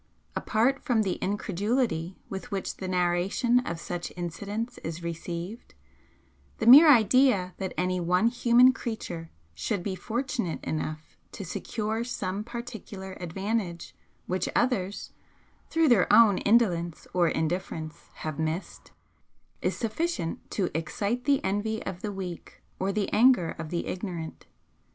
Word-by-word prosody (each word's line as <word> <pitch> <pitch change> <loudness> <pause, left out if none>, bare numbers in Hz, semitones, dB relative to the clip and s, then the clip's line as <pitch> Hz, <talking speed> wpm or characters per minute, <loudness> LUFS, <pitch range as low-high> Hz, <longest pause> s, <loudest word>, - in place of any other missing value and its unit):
Apart 250 +5 +1
from 230 -4 +2
the 190 -3 -2
incredulity 205 -2 -1
with 190 -1 -6
which 195 -2 -3
the 190 - -5
narration 180 +7 +2
of 170 0 -3
such 175 0 -5
incidents 205 +8 -4
is 165 +1 -6
received, 170 +5 -6 0.8
the - - -2
mere 285 +7 +10
idea 220 -5 +4
that 190 -2 -3
any 180 0 0
one 180 +4 +2
human 240 +1 +5
creature 180 -10 -5 0.2
should 80 - -2
be 195 - -2
fortunate 230 - -2
enough 155 0 -4 0.2
to 195 - -6
secure 220 +5 -3
some 205 -4 -3
particular 220 -5 -7
advantage 185 0 -3 0.3
which 185 0 -1
others, 205 -6 0 0.6
through 325 -1 +3
their 235 -9 +4
own 215 -5 +7
indolence 180 -7 +2
or 175 -2 +3
indifference, 160 -1 -3
have 155 -1 -5
missed, 160 +3 -3 0.7
is - - -1
sufficient 225 - -2
to 185 -6 -2
excite 200 +9 -2
the 280 -2 +3
envy 205 +3 -1
of 185 -2 -5
the 210 - -3
weak 185 -3 -7 0.2
or 190 +1 0
the 205 -1 0
anger 225 -7 +5
of 160 -1 -5
the 170 0 -2
ignorant. 180 -4 -5
195 Hz, 130 wpm, -28 LUFS, 175-230 Hz, 0.8 s, mere